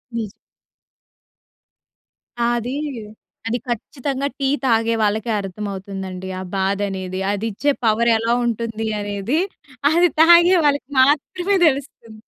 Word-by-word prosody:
నిజం. 220 Hz, -4 st, -3 dB, 2.1 s
ఆ! 235 Hz, -, +1 dB
అది. 245 Hz, +3 st, -3 dB, 0.7 s
అది 235 Hz, +2 st, 0 dB
ఖచ్చితంగా 265 Hz, +3 st, -3 dB
టీ 275 Hz, -, +1 dB, 0.2 s
తాగే 230 Hz, -2 st, +2 dB
వాళ్ళకే 215 Hz, +2 st, 0 dB
అర్థమవుతుందండి. 195 Hz, -1 st, -6 dB
ఆ -, -, -5 dB
బాధ 195 Hz, +1 st, 0 dB
అనేది. 185 Hz, -1 st, -5 dB
అది 205 Hz, +2 st, -2 dB
ఇచ్చే 285 Hz, +8 st, +1 dB
పవర్ 225 Hz, +2 st, +3 dB
ఎలా 230 Hz, +1 st, 0 dB
ఉంటుంది 225 Hz, -1 st, -2 dB
అనేది. 205 Hz, +8 st, -1 dB, 0.5 s
అది 345 Hz, +2 st, +4 dB
తాగే 345 Hz, +2 st, +7 dB
వాళ్ళకి 285 Hz, -2 st, +1 dB
మాత్రమే 330 Hz, +8 st, +2 dB
తెలుస్తుంది. 265 Hz, -6 st, -3 dB
230 Hz, 110 wpm, -20 LUFS, 205-275 Hz, 2.1 s, తాగే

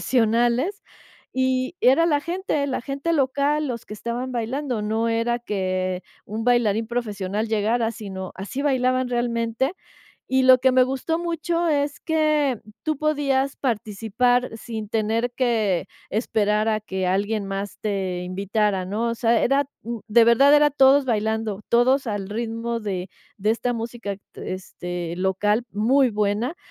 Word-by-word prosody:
profesionales, 240 Hz, -, +1 dB, 0.5 s
y 260 Hz, +4 st, 0 dB
era 270 Hz, +7 st, +5 dB
la 295 Hz, -3 st, +2 dB
gente, 340 Hz, -3 st, -2 dB
la 260 Hz, -3 st, -2 dB
gente 280 Hz, +6 st, -2 dB
local, 285 Hz, +2 st, +1 dB
los 235 Hz, -2 st, -5 dB
que 210 Hz, -, -7 dB
estaban 235 Hz, +4 st, -4 dB
bailando, 245 Hz, 0 st, -2 dB
no 220 Hz, +2 st, 0 dB
era 230 Hz, +1 st, 0 dB
que 185 Hz, -4 st, -2 dB, 0.2 s
un 220 Hz, +2 st, -4 dB
bailarín 230 Hz, -3 st, +2 dB
profesional 215 Hz, -3 st, -2 dB
llegara, 225 Hz, +2 st, +1 dB
sino, 190 Hz, -4 st, -7 dB
así 205 Hz, +8 st, -5 dB
bailaban 255 Hz, -2 st, +1 dB
realmente. 240 Hz, +3 st, 0 dB, 0.6 s
Y 265 Hz, 0 st, +3 dB
lo 255 Hz, 0 st, +8 dB
que 260 Hz, 0 st, +3 dB
me 255 Hz, 0 st, +5 dB
gustó 270 Hz, +6 st, -2 dB
mucho 340 Hz, 0 st, -1 dB
es 290 Hz, -1 st, 0 dB
que 305 Hz, -6 st, +1 dB, 0.2 s
tú 310 Hz, -1 st, 0 dB
podías 280 Hz, -3 st, +1 dB
participar 230 Hz, +1 st, 0 dB
sin 220 Hz, -2 st, -6 dB
tener 225 Hz, +3 st, 0 dB
que 225 Hz, -8 st, 0 dB, 0.2 s
esperar 210 Hz, 0 st, +1 dB
a 215 Hz, -1 st, +1 dB
que 190 Hz, -3 st, -3 dB
alguien 200 Hz, +2 st, 0 dB
más 195 Hz, +1 st, -5 dB
te 190 Hz, -4 st, -2 dB
invitara, 195 Hz, +1 st, 0 dB
¿no? 220 Hz, +5 st, -1 dB
O -, -, -1 dB
sea, 230 Hz, 0 st, +2 dB
era, 275 Hz, +2 st, +3 dB, 0.2 s
mm, 235 Hz, +1 st, -4 dB
de 230 Hz, +2 st, +6 dB
verdad 275 Hz, +5 st, +6 dB
era 295 Hz, 0 st, +5 dB
todos 275 Hz, 0 st, +5 dB
bailando, 220 Hz, -2 st, -1 dB
todos 255 Hz, +3 st, +3 dB
al 205 Hz, -3 st, -3 dB
ritmo 230 Hz, +1 st, -3 dB
de 190 Hz, -3 st, -4 dB, 0.3 s
de 210 Hz, +2 st, +1 dB
esta 245 Hz, +2 st, 0 dB
música, 230 Hz, -3 st, -5 dB, 0.2 s
t -, -, -6 dB
este, 175 Hz, -2 st, -6 dB
local, 205 Hz, +4 st, +1 dB
muy 250 Hz, +5 st, +3 dB
buena. 210 Hz, +8 st, -1 dB
235 Hz, 150 wpm, -23 LUFS, 210-265 Hz, 0.6 s, lo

